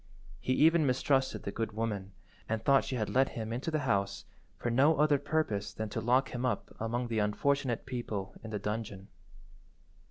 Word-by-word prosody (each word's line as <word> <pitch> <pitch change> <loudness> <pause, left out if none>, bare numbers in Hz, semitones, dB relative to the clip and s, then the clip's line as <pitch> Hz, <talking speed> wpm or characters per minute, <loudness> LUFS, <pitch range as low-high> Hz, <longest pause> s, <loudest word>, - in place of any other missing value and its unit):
He 130 - 0
even 160 +1 +5
mistrusted 130 +1 +1
the 100 - -3
good 110 +1 -3
woman, 105 -3 -3 0.4
and 110 0 -2
thought 140 -1 +5
she 130 - -3
had 110 -4 -1
let 135 +1 +3
him 110 0 -3
into 125 +7 -2
the 155 -2 0
house 100 -4 0 0.3
for 120 - -2
no 140 +6 +4
other 150 -1 +4
purpose 140 -9 -1
than 110 0 -4
to 115 - -3
lock 125 +4 +3
him 125 0 -4
up 125 - -2
among 120 +2 -1
the 115 -2 -1
unfortunate 125 +4 0
people 115 -6 -4
in 110 - -6
the 105 - -2
dungeon. 105 -2 -4
120 Hz, 185 wpm, -31 LUFS, 110-135 Hz, 0.4 s, even